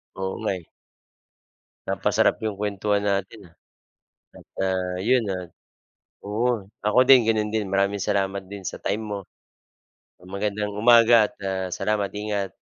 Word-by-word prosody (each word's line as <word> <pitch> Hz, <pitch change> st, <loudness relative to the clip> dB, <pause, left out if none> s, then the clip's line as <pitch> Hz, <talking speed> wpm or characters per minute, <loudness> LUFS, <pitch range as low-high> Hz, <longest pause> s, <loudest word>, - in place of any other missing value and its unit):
Oo 95 Hz, 0 st, -3 dB
nga, 110 Hz, -, 0 dB
eh. 85 Hz, -, -12 dB, 1.2 s
Napasarap -, -, +2 dB
'yong 110 Hz, -2 st, -2 dB
kuwentuhan 105 Hz, 0 st, -1 dB
natin 100 Hz, +2 st, -2 dB
ah. -, -, -29 dB, 0.8 s
At, -, -, -15 dB
ah, 95 Hz, -1 st, -1 dB
'yon, 120 Hz, +4 st, +2 dB
ah, 90 Hz, -1 st, -5 dB, 0.8 s
oo, 105 Hz, -1 st, -1 dB, 0.2 s
ako 105 Hz, +4 st, +3 dB
din 125 Hz, -4 st, +8 dB
gano'n 110 Hz, -1 st, +1 dB
din, 110 Hz, -1 st, -1 dB
maraming 100 Hz, +1 st, 0 dB
salamat 100 Hz, -1 st, 0 dB
din 100 Hz, +1 st, -9 dB
sa -, -, -5 dB
time 105 Hz, +2 st, -2 dB
mo. 105 Hz, -2 st, -4 dB, 1.0 s
Magandang 100 Hz, +2 st, -3 dB
umaga 115 Hz, 0 st, +6 dB
at, -, -, -18 dB
ah, 95 Hz, -1 st, -2 dB
salamat. 100 Hz, +1 st, -1 dB
Ingat. 105 Hz, -2 st, -3 dB
100 Hz, 135 wpm, -24 LUFS, 95-110 Hz, 1.2 s, din